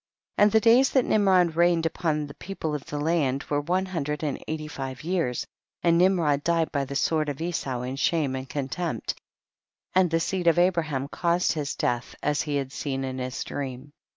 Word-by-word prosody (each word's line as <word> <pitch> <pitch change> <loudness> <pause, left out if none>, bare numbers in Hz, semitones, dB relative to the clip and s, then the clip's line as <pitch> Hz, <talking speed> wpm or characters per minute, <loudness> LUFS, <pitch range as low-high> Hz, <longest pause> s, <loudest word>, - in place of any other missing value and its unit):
16. - - +7
And 210 - +5
the 220 - +5
days 235 +4 +5
that 260 -3 +4
Nimrod 185 -5 +3
reigned 170 -1 +3
upon 155 -2 0
the 145 - -10
people 170 -4 -5
of 145 -2 -5
the 145 - -4
land 145 -4 +1
were 145 0 +2
one 180 +5 0
hundred 150 -5 -3
and 145 -3 -3
eighty 155 -1 -4
five 135 -1 -6
years; 165 -8 -1 0.4
and 170 -1 +4
Nimrod 170 -6 +3
died 165 -1 +1
by 140 -2 0
the 140 +1 -6
sword 155 +1 +1
of 140 - -5
Esau 140 -7 -2
in 130 +2 -4
shame 145 -2 +1
and 130 0 -6
contempt, 150 +4 -3 0.8
and 185 -1 +4
the 165 0 +1
seed 180 +1 -1
of 170 - +5
Abraham 165 -7 +1
caused 170 +4 +1
his 150 -3 -2
death 120 0 -2
as 150 0 +1
he 150 -2 -2
had 135 -2 -2
seen 135 -1 -3
in 130 0 -4
his 125 0 -3
dream. 135 +1 -6
155 Hz, 200 wpm, -26 LUFS, 140-175 Hz, 0.8 s, 16